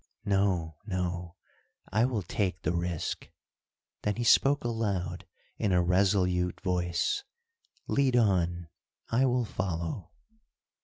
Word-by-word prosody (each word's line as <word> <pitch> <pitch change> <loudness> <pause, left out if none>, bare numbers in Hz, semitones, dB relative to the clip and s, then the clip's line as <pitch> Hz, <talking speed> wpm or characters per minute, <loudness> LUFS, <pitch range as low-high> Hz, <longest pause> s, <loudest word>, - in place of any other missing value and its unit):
No! 95 -6 +1
no! 90 -2 -3 0.6
I 110 +4 +3
will 120 -6 -1
take 95 +1 -2
the - - +1
risk." 85 -1 -2 0.7
Then 105 -1 0
he 120 - -2
spoke 140 +4 +5
aloud, 100 -7 -2 0.3
in 100 - +1
a 90 -1 +4
resolute 90 -1 +2
voice, 90 - 0 0.6
"Lead 135 -3 +2
on, 90 -7 +2 0.4
I 130 +3 +4
will 125 -1 +1
follow." 90 -2 -3
95 Hz, 110 wpm, -29 LUFS, 90-110 Hz, 0.7 s, spoke